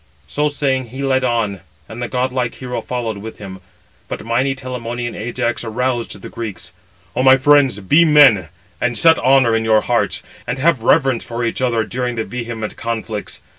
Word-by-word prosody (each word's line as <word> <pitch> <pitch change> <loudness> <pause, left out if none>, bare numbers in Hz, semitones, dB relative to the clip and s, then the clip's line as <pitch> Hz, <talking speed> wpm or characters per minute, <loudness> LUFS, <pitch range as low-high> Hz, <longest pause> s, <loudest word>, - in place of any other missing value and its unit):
So 150 - 0
saying, 135 -3 -1
he 130 +4 -6
led 130 -1 +1
on, 115 -6 -1 0.3
and 110 +3 -8
the 120 - -2
godlike 125 0 -1
hero 125 -1 -5
followed 115 -4 -4
with 110 +2 -8
him. 95 -2 -9 0.5
But - - -6
mighty 130 +4 0
Telamonian 120 -2 -5
Ajax 120 +1 -2
aroused 120 -1 -2
the - - -6
Greeks. 110 -6 -7 0.4
"O 125 - +1
my 130 0 +7
friends, 135 -4 +4
be 150 - +4
men, 140 - +5 0.3
and 125 -1 0
set 165 -1 +5
honour 130 -2 +4
498 115 - +2
in - - -4
your 110 -1 +4
hearts, - - 0 0.2
and 125 +2 -2
have 140 -3 +2
reverence 135 0 +2
for 120 0 -3
each 115 - -2
other 120 -3 +1
during 125 +3 -3
the 110 -1 -2
vehement 115 -3 -5
conflicts. 110 -2 -4
120 Hz, 180 wpm, -18 LUFS, 115-130 Hz, 0.5 s, my